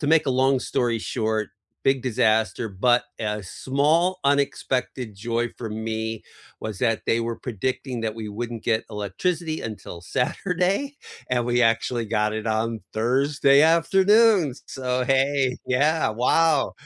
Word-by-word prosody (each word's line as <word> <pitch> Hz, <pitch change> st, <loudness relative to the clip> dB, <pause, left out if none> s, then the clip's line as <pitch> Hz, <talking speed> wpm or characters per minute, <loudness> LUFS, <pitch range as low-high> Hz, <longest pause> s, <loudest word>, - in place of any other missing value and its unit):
to 145 Hz, -, -2 dB
make 160 Hz, 0 st, +4 dB
a -, -, +2 dB
long 130 Hz, 0 st, +2 dB
story 120 Hz, -2 st, 0 dB
short, 110 Hz, -2 st, -2 dB, 0.3 s
big 135 Hz, -1 st, +2 dB
disaster, 110 Hz, -2 st, +1 dB
but 120 Hz, +5 st, +2 dB
a 105 Hz, -1 st, -3 dB
small 155 Hz, -, +1 dB
unexpected 130 Hz, -4 st, 0 dB
joy 115 Hz, +3 st, -2 dB
for 115 Hz, -3 st, -5 dB
me 110 Hz, 0 st, -4 dB, 0.4 s
was 110 Hz, -3 st, -5 dB
that 115 Hz, -3 st, 0 dB
they 115 Hz, -, +2 dB
were 115 Hz, 0 st, -3 dB
predicting 125 Hz, +2 st, -3 dB
that 110 Hz, -1 st, -2 dB
we 110 Hz, -2 st, -6 dB
wouldn't 115 Hz, +1 st, -5 dB
get 110 Hz, -1 st, +1 dB
electricity 155 Hz, -, -2 dB
until 105 Hz, -5 st, -7 dB
Saturday, 180 Hz, -, -1 dB, 0.3 s
and 120 Hz, -1 st, +1 dB
we 120 Hz, 0 st, +2 dB
actually 115 Hz, +1 st, +1 dB
got 105 Hz, +1 st, 0 dB
it 110 Hz, 0 st, -4 dB
on 110 Hz, +1 st, -1 dB
Thursday 140 Hz, +4 st, +3 dB
afternoon, 190 Hz, +3 st, +4 dB
s 125 Hz, -, -13 dB
so 125 Hz, -1 st, -2 dB
hey, 135 Hz, 0 st, +2 dB
yeah, 150 Hz, +5 st, +2 dB
wow. 140 Hz, +6 st, +2 dB
125 Hz, 140 wpm, -24 LUFS, 110-140 Hz, 0.4 s, make